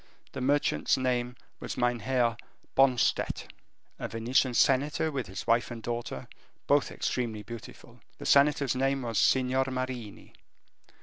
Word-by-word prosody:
This - - -6
merchant's 145 +3 +2
name 125 -1 -1 0.2
was - - -5
Meinheer 120 0 +1 0.4
Bonstett. 130 -3 +2 0.5
A - - -3
Venetian 120 +2 +1
senator 145 +4 +2
with 130 -6 -3
his 95 +1 -7
wife 115 +1 +2
and 115 -2 -8
daughter, 120 0 -4 0.4
both 145 0 +3
extremely 115 -4 -3
beautiful. 115 +1 -11 0.2
The - - -9
senator's 140 -2 +4
name 135 +1 0
was 115 -4 -1
Signor 130 0 +3
Marini. 130 -5 -5
125 Hz, 125 wpm, -29 LUFS, 120-135 Hz, 0.5 s, senator's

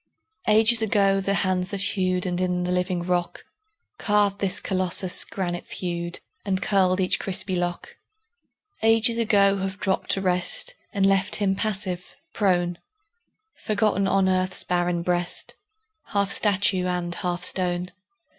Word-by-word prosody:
Ages 220 +2 +5
ago 200 -3 +2
the 200 +1 -1
hands 185 -2 0
that 200 -2 -1
hewed, 185 -1 0
And 180 0 -2
in 180 -1 -1
the 180 - -2
living 180 -1 -1
rock 175 -1 -2 0.6
Carved 205 -2 +1
this 195 -2 0
Colossus, 185 0 +2
granite 175 -3 -5
thewed 170 -1 -5 0.2
And 190 -2 -1
curled 190 -2 +1
each 185 -1 +1
crispy 190 -1 -2
lock: 175 -1 -4 0.8
Ages 225 +1 +3
ago 200 -3 +3
have 190 0 -4
dropped 190 -2 -2
to 195 - -1
rest 180 -1 0 0.2
And 195 -1 +1
left 195 +1 +2
him 200 -2 +1
passive, 190 -4 -3 0.2
prone, 175 -4 0 0.7
Forgotten 205 -2 0
on 195 0 +2
earth's 185 0 +1
barren 175 -1 -1
breast, 175 0 -2 0.5
Half 200 -2 -1
statue 195 -3 +2
and 175 -1 -2
half 175 0 -3
stone. 180 -1 +2
185 Hz, 135 wpm, -24 LUFS, 180-200 Hz, 0.8 s, Ages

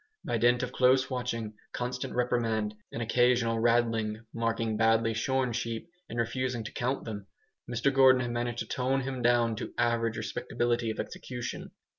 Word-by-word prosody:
By - - 0
dint 120 +1 +4
of 125 - -3
close 130 +1 +3
watching, 115 -4 -3 0.2
constant 125 +1 -3
reprimand, 115 -3 0 0.2
and 115 - -3
occasional 120 -1 +3
"raddling" 115 -2 +1
(marking 115 -1 -1
badly 115 +1 +3
shorn 125 +2 0
sheep 115 +1 -3 0.2
and 120 - -6
refusing 120 +1 -1
to 110 - -7
count 130 +3 -1
them) 100 -3 -6 0.4
Mr 125 +3 +1
Gordon 130 -1 +6
had 120 -1 -2
managed 120 0 -2
to - - -3
tone 130 +1 0
him 130 -1 -4
down 120 -1 +3
to - - -6
average 115 -2 +1
respectability 120 +2 -1
of 110 - -4
execution. 125 -2 -5
120 Hz, 160 wpm, -29 LUFS, 115-125 Hz, 0.4 s, Gordon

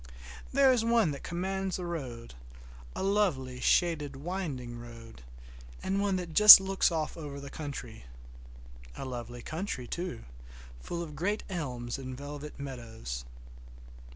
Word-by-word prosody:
There 275 0 +5
is 245 -3 +2
one 230 -7 +3
that 140 - -7
commands 190 +2 -3
the 180 - -5
road, 130 - -6 0.6
a - - -3
lovely, 170 -11 0
shaded, 150 -3 +1
winding 135 -7 -5
road, 115 - -12 0.6
and 195 +1 0
one 200 -1 +1
that 175 -3 -4
just 210 +3 +13
looks 195 -1 +1
off 160 -2 -2
over 145 -3 -7
the 140 -1 -9
country. 145 - -7 0.9
A - - -6
lovely 120 -1 -7
country, 160 -6 -4
too, 175 - -5 0.6
full 170 - -5
of 155 -3 -9
great 200 +8 -1
elms 125 -8 -4
and 130 -1 -7
velvet 145 +1 -8
meadows. 115 - -7
150 Hz, 135 wpm, -30 LUFS, 125-185 Hz, 0.9 s, just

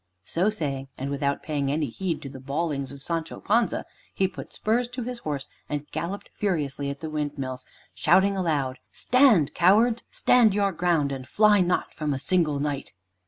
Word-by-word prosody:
So 185 +5 +1
saying, 140 -9 -3
and 135 +2 -4
without 140 0 -1
paying 140 -3 -1
any 150 +1 0
heed 165 +6 -3
to 135 - -6
the 135 -1 -9
bawlings 140 0 -2
of 140 -1 -10
Sancho 165 -1 -3
Panza, 230 +2 +1 0.3
he 190 - +2
put - - -9
spurs 235 +3 0
to 245 0 -5
his 245 0 -4
horse 145 - -4 0.2
and 145 0 -3
galloped 185 +5 -4
furiously 145 -8 -1
at 140 +2 -6
the 160 - -4
windmills, 140 -4 -4 0.3
shouting 190 +5 +4
aloud, 145 -8 -1
"Stand, 235 - +4
cowards! 220 +7 +4
stand 230 -5 +4
your 200 -1 +2
ground, 165 -5 +1
and 130 -1 -5
fly 210 -1 +5
not 180 0 0
from 150 -2 -2
a - - -4
single 155 -3 +1
Knight." 145 -1 -3
155 Hz, 175 wpm, -26 LUFS, 140-195 Hz, 0.3 s, fly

